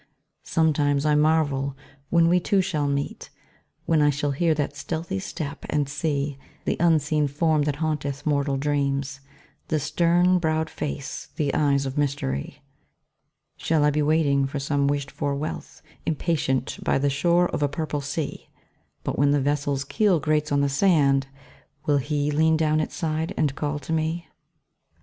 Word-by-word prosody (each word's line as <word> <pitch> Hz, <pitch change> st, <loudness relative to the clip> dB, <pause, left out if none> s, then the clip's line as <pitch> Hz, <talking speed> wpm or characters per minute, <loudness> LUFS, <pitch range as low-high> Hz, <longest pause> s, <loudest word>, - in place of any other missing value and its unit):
Sometimes 145 Hz, -3 st, +1 dB
I 150 Hz, -, +3 dB
marvel 145 Hz, -3 st, +2 dB, 0.3 s
when 170 Hz, -1 st, +4 dB
we 180 Hz, +1 st, +4 dB
two 195 Hz, +3 st, +1 dB
shall 155 Hz, -6 st, 0 dB
meet, 140 Hz, 0 st, -3 dB, 0.6 s
When 160 Hz, -2 st, +3 dB
I 145 Hz, -, +5 dB
shall 145 Hz, 0 st, 0 dB
hear 160 Hz, +3 st, +1 dB
that 145 Hz, -1 st, -2 dB
stealthy 160 Hz, -, -3 dB
step, 140 Hz, +8 st, -6 dB
and 145 Hz, -2 st, +1 dB
see 145 Hz, -1 st, -2 dB, 0.3 s
The -, -, +1 dB
unseen 155 Hz, -3 st, +2 dB
form 155 Hz, +2 st, +1 dB
that 145 Hz, -2 st, 0 dB
haunteth 145 Hz, -3 st, -3 dB
mortal 140 Hz, -2 st, +1 dB
dreams, 140 Hz, -1 st, -1 dB, 0.5 s
The 155 Hz, -, 0 dB
stern 175 Hz, +5 st, +3 dB
browed 160 Hz, -1 st, 0 dB
face, 70 Hz, -, -5 dB
the 145 Hz, -2 st, -1 dB
eyes 140 Hz, -2 st, +2 dB
of 135 Hz, +2 st, -3 dB
mystery. 130 Hz, -, -2 dB, 0.9 s
Shall 160 Hz, -2 st, +1 dB
I 150 Hz, -, +4 dB
be 150 Hz, +1 st, 0 dB
waiting 145 Hz, -3 st, +2 dB
for 140 Hz, -, -5 dB
some 140 Hz, 0 st, 0 dB
wished 140 Hz, -1 st, -1 dB
for 145 Hz, -2 st, -2 dB
wealth, 150 Hz, +3 st, -6 dB, 0.2 s
Impatient, 140 Hz, -5 st, -1 dB
by -, -, +2 dB
the 140 Hz, +1 st, +1 dB
shore 175 Hz, +5 st, +3 dB
of -, -, -3 dB
a 145 Hz, -, +2 dB
purple 150 Hz, 0 st, -3 dB
sea? 145 Hz, +2 st, -4 dB, 0.5 s
But -, -, -3 dB
when 145 Hz, 0 st, +4 dB
the 145 Hz, 0 st, +3 dB
vessel's 140 Hz, 0 st, 0 dB
keel 190 Hz, +4 st, +2 dB
grates 150 Hz, 0 st, 0 dB
on 140 Hz, 0 st, +3 dB
the 140 Hz, -, +2 dB
sand, 140 Hz, -3 st, +3 dB, 0.6 s
Will 145 Hz, -2 st, +3 dB
HE 145 Hz, +1 st, -1 dB
lean 160 Hz, +2 st, +3 dB
down 155 Hz, -1 st, +2 dB
its 155 Hz, -, -3 dB
side 160 Hz, -1 st, -2 dB
and 145 Hz, -3 st, +1 dB
call 145 Hz, +1 st, -2 dB
to 145 Hz, +3 st, -5 dB
me? 160 Hz, +2 st, -1 dB
145 Hz, 165 wpm, -24 LUFS, 140-160 Hz, 0.9 s, I